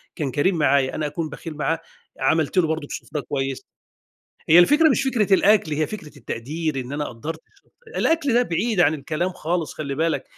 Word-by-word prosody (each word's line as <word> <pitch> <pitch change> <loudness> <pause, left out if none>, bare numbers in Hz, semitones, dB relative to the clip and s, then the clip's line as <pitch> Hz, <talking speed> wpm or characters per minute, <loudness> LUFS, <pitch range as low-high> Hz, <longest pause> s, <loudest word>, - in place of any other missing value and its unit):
كان 145 -4 -2
كريم 170 +8 +1
معايّا، 140 -3 +2
أنا 155 - -2
أكون 155 +2 -4
بخيل 160 +2 -8
معاه؟ 155 +2 0 0.4
عملت 155 +5 +1
له 175 -3 +4
برضه 160 -2 -2
سفرة 150 - -5
كويس. 135 -1 -4 0.8
هي 165 - +8
الفكرة 295 - +6
مش 275 - +2
فكرة 225 -7 +2
الأكل، 200 -5 +3
هي 155 +1 0
فكرة 155 -8 -9
التقدير، 145 +5 -3
إن 125 +2 -7
أنا 150 +1 -2
قدرت، 155 +7 -6 0.6
الأكل 320 -5 +2
ده 245 - +5
بعيد 215 0 0
عن 160 - +4
الكلام 155 +4 -2
خالص 170 -2 -2
خلّي 140 -3 -4
بالَك، 160 +3 0
160 Hz, 180 wpm, -23 LUFS, 145-180 Hz, 0.8 s, هي